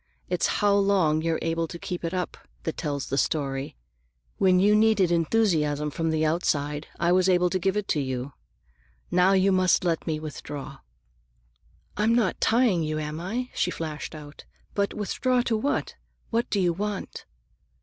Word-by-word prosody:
It's - - +1
how 205 -1 +2
long 190 -6 +3
you're 165 0 0
able 165 0 -1
to 170 - -8
keep 175 +1 -5
it 165 - -2
up 180 -1 -3 0.3
that 160 - -3
tells 145 -4 -3
the 135 - +1
story. 135 - -1 0.6
When 185 -1 +4
you 205 +3 +5
needed 210 -4 +4
enthusiasm 160 -5 +1
from 165 +2 -1
the 160 0 +1
outside, 150 -2 -1
I 170 0 +2
was 185 +1 +4
able 180 -1 +3
to 185 - 0
give 190 +3 0
it 210 - -2
to 150 - +1
you. 130 0 -3 0.8
Now 180 +2 +4
you 195 0 +4
must 185 -1 +3
let 170 -2 -1
me 155 -1 -1
withdraw." 145 -2 -7 1.2
"I'm 220 +2 +3
not 225 -6 +1
tying 225 -7 +3
you, 155 -1 -2
am 150 0 -4
I?" 235 +9 -3
she - - 0
flashed 155 -1 -5
out. 150 -1 -11 0.3
"But 200 0 -1
withdraw 250 +5 0
to 235 - 0
what? 275 +7 -1 0.4
What 235 +1 0
do 205 - 0
you 175 -2 +2
want?" 205 +2 -5
175 Hz, 170 wpm, -26 LUFS, 155-200 Hz, 1.2 s, you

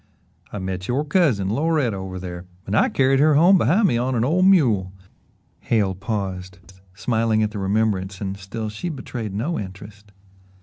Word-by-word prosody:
"I - - -5
met 95 -1 -4
your 135 +5 0
cousin, 140 - +1
Loretta, 145 -5 +1
over 95 -1 -6
there 90 -1 -7 0.2
and 100 - -2
I - - +3
carried 135 0 +2
her 150 +1 +4
home 175 +5 +6
behind 195 +6 +3
me 120 - +1
on 125 +1 -1
an 115 0 +1
old 180 +7 +2
mule" 115 - +3 0.7
Hale 105 -5 0
paused, 95 -3 -4 0.4
smiling 110 0 +1
at 105 - -1
the 105 - -5
remembrance 95 -1 -1
and 95 -1 -4
still 100 +3 -6
she 110 +12 -5
betrayed 120 - -6
no 145 +12 -2
interest. 100 +1 -10
110 Hz, 170 wpm, -22 LUFS, 95-135 Hz, 0.7 s, home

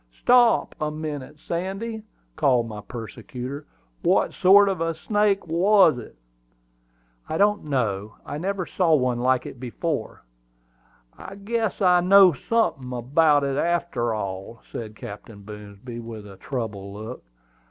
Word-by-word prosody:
"Stop 245 -1 +4
a 150 - 0
minute, 150 -2 -6
Sandy," 195 +8 -4 0.3
called 130 -6 +2
my 105 -2 -7
persecutor. 125 +5 -7 0.3
"What - - +2
sort 200 +2 +6
of 190 -4 -1
a 165 0 -1
snake 205 +3 +1
was 175 -3 +4
it?" 115 - -11 1.1
"I 160 - -1
don't 205 0 +2
know; 110 -7 -2
I 145 - -5
never 190 +1 -2
saw 170 -3 +2
one 125 -3 0
like 130 +1 +1
it 125 - -9
before." 140 +5 -4 0.9
"I 195 - -10
guess 220 0 -2
I 180 -1 +5
know 190 0 +7
sunthin' 140 - -1
about 145 +4 +3
it, 140 0 -1
arter 170 -9 0
all," 100 +2 -6
said 110 -2 -6
Captain 100 0 -10
Boomsby, 105 +3 -9
with 115 -2 -8
a 100 -2 -12
troubled 100 -4 -5
look. 110 +4 -8
145 Hz, 135 wpm, -24 LUFS, 115-185 Hz, 1.1 s, know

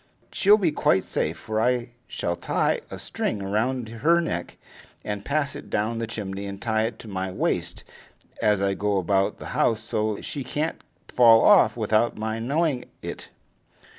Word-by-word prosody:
She'll 205 +2 +5
be 180 -7 +1
quite 95 -9 +2
safe, - - -2
for 110 0 -2
I 125 0 +1 0.2
shall 85 - -2
tie 85 - 0
a - - -7
string - - -3
round 110 +5 -1
her 140 +10 +2
neck, 85 - -3 0.5
and 105 -1 -4
pass 145 +2 -1
it - - -9
down 110 +2 -1
the 115 - -3
chimney, 100 -3 -5
and 100 0 -7
tie 110 0 0
it 115 -1 -8
to - - -12
my 95 -2 -3
wrist 90 - -2 0.6
as 105 -2 +2
I 100 0 +2
go 100 0 0
about 95 +1 +1
the - - -8
house, 110 -1 +2
so 110 -2 -2
she 140 - -5
can't 150 +5 -3 0.3
fall 115 -2 +6
off 205 -11 +6
without 110 +1 +1
my 110 +1 -3
knowing 140 +2 0 0.2
it." - - -7
110 Hz, 170 wpm, -25 LUFS, 100-125 Hz, 0.6 s, fall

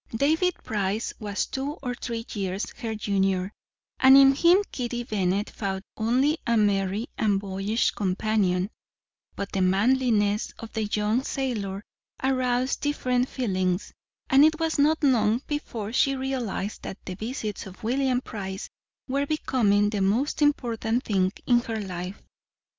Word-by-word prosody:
David 320 +8 +2
Price 210 +1 -2
was 205 -2 -2
two 275 +2 -3
or 250 -2 -2
three 230 -2 -5
years 195 -1 -2
her 225 -4 -4
junior, 195 -2 0 0.5
and 265 +1 +8
in 275 0 +8
him 345 +7 +5
Kitty 240 -1 -3
Bennet 200 -3 -1
found 195 -2 -3
only 260 +8 +2
a 235 0 +3
merry 200 0 +1
and 205 -3 +2
boyish 195 +3 0
companion; 195 -1 0 0.6
but 200 - -5
the 195 - -1
manliness 210 +1 +2
of 230 - -9
the 220 -1 -1
young 210 +3 +1
sailor 210 -9 -3 0.4
aroused 255 -1 +1
different 255 -3 0
feelings, 185 -7 -1 0.3
and 270 +2 +6
it 315 +1 +4
was 325 -2 0
not 310 +2 +3
long 235 -2 +3
before 235 -8 -4
she 275 +1 +3
realized 255 -6 -3
that 190 - -6
the 185 - -4
visits 215 -1 -5
of 190 +4 -13
William 255 +2 +1
Price 190 -6 -6 0.4
were 280 +2 0
becoming 210 -9 +2
the 205 -2 -1
most 230 +11 +1
important 240 -4 +1
thing 190 -5 +1
in 240 -1 +4
her 225 -2 -4
life. 185 -1 -5
225 Hz, 140 wpm, -26 LUFS, 200-260 Hz, 0.6 s, and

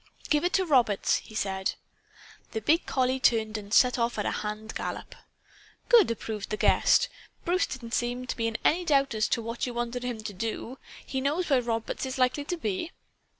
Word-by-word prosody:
"Give 300 0 +3
it 355 - 0
to 380 - +3
Roberts," 245 - +3
he 215 - -11
said. 190 -2 -1 0.8
The 220 - -1
big 320 - +2
collie 260 0 +1
turned 220 -3 +2
and 205 -1 -6
set 250 +2 +5
off 235 0 0
at 210 - -1
a - - 0
hand 215 +1 -4
gallop. - - -5 0.8
"Good!" 465 - +7
approved 220 -2 -4
the 215 - -2
guest. - - +4 0.4
"Bruce 360 +2 +2
didn't 235 -3 -7
seem 245 +1 -1
to - - -3
be 230 -1 -1
in 225 0 -2
any 350 +4 +3
doubt 275 -5 +2
as 215 -1 +1
to 230 - 0
what 230 +2 -3
you 245 - -5
wanted 240 +1 -2
him 245 -3 -4
to 215 -1 -5
do. 225 +5 -4 0.3
He 265 - -3
knows 300 +5 -1
where 260 -2 +5
Roberts 230 +2 -2
is 260 - -4
likely 255 +3 +1
to 355 - -3
be?" 285 - -3
240 Hz, 200 wpm, -28 LUFS, 220-275 Hz, 0.8 s, Good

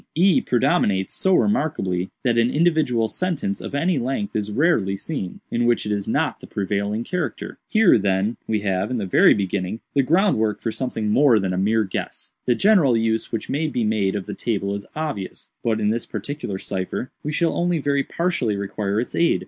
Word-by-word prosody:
E 180 +3 +4
predominates 120 - +1
so 190 -1 +2
remarkably 145 - 0
that 120 -3 +2
an 115 +1 +3
individual 150 -7 +2
sentence 150 - -2
of - - -6
any 165 +1 +1
length 135 - -3
is 105 -1 -2
rarely 105 - +2
seen, 100 - -5
in 120 0 +1
which 120 -3 +2
it 105 - -2
is 100 -1 -2
not - - 0
the - - -12
prevailing 100 +2 -2
character. 180 +5 -4
"Here, 215 - +5
then, 100 +3 0
we 105 -2 -1
leave, 95 0 0
in 125 - -1
the 105 - -2
very 95 - +5
beginning, 95 +1 -2
the 140 - +4
groundwork 135 - +2
for 115 - -2
something 110 -2 -2
more 135 -1 +5
than 95 -3 -1
a - - -2
mere 110 +3 +2
guess. 95 - -5 0.2
The 120 - +4
general 175 - +4
use 110 0 0
which 115 - -3
may 155 +3 -1
be 125 -6 -1
made 105 -3 +1
of 100 - -3
the - - -5
table 100 -4 -2
is 100 0 -6
obvious—but, 115 -5 -4
in 105 0 +1
this 115 +1 -3
particular 110 -1 -5
cipher, 95 +6 -4
we 150 - -3
shall 165 +2 +1
only 175 0 +1
very 140 -1 +1
partially 150 - -1
require 100 +1 -2
its 120 - -4
aid. 170 - +2
115 Hz, 195 wpm, -22 LUFS, 100-150 Hz, 0.2 s, Here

